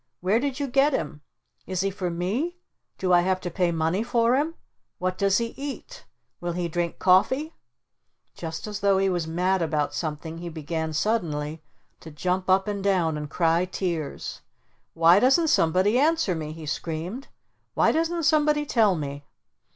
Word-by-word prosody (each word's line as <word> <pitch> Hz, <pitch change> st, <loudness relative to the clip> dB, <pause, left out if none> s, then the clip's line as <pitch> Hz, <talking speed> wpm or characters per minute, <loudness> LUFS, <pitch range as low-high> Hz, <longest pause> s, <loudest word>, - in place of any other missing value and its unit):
Where 195 Hz, +5 st, +2 dB
did 275 Hz, +1 st, -2 dB
you 285 Hz, -, 0 dB
get 275 Hz, +3 st, +3 dB
him? 150 Hz, -, -3 dB, 0.5 s
Is 185 Hz, -1 st, -1 dB
he 195 Hz, 0 st, 0 dB
for 185 Hz, -2 st, -3 dB
me? 210 Hz, -, -2 dB, 0.4 s
Do 185 Hz, -1 st, +1 dB
I 175 Hz, -, +6 dB
have 185 Hz, +1 st, 0 dB
to 175 Hz, -, -4 dB
pay 175 Hz, 0 st, +1 dB
money 165 Hz, +4 st, 0 dB
for 235 Hz, +1 st, +2 dB
him? 310 Hz, +4 st, 0 dB, 0.4 s
What 185 Hz, 0 st, -1 dB
does 200 Hz, +1 st, +2 dB
he 230 Hz, -1 st, -2 dB
eat? 290 Hz, -, -7 dB, 0.3 s
Will 175 Hz, 0 st, -3 dB
he 175 Hz, 0 st, -2 dB
drink 170 Hz, 0 st, -2 dB
coffee?" 260 Hz, -, +3 dB, 0.8 s
Just 165 Hz, -1 st, -6 dB
as 210 Hz, -1 st, -5 dB
though 200 Hz, -1 st, +3 dB
he 195 Hz, 0 st, +2 dB
was 175 Hz, -3 st, -1 dB
mad 180 Hz, +3 st, +1 dB
about 150 Hz, -3 st, 0 dB
something 160 Hz, 0 st, -4 dB
he 175 Hz, 0 st, -6 dB
began 160 Hz, 0 st, -4 dB
suddenly 155 Hz, -5 st, -1 dB, 0.4 s
to 160 Hz, -, -11 dB
jump 180 Hz, +5 st, -2 dB
up 190 Hz, +1 st, +3 dB
and 200 Hz, -2 st, -3 dB
down 180 Hz, -5 st, +2 dB
and 150 Hz, -1 st, -5 dB
cry 165 Hz, +2 st, +2 dB
tears. 170 Hz, -5 st, -4 dB, 0.5 s
"Why 170 Hz, +3 st, +6 dB
doesn't 275 Hz, +7 st, +4 dB
somebody 185 Hz, -, +3 dB
answer 315 Hz, -, +2 dB
me?" 155 Hz, -2 st, -4 dB
he 160 Hz, 0 st, -9 dB
screamed. 165 Hz, -, -4 dB, 0.5 s
"Why -, -, +4 dB
doesn't 330 Hz, +1 st, 0 dB
somebody 300 Hz, -1 st, +3 dB
tell 220 Hz, -8 st, +3 dB
me?" 145 Hz, -2 st, -5 dB
185 Hz, 170 wpm, -25 LUFS, 165-230 Hz, 0.8 s, I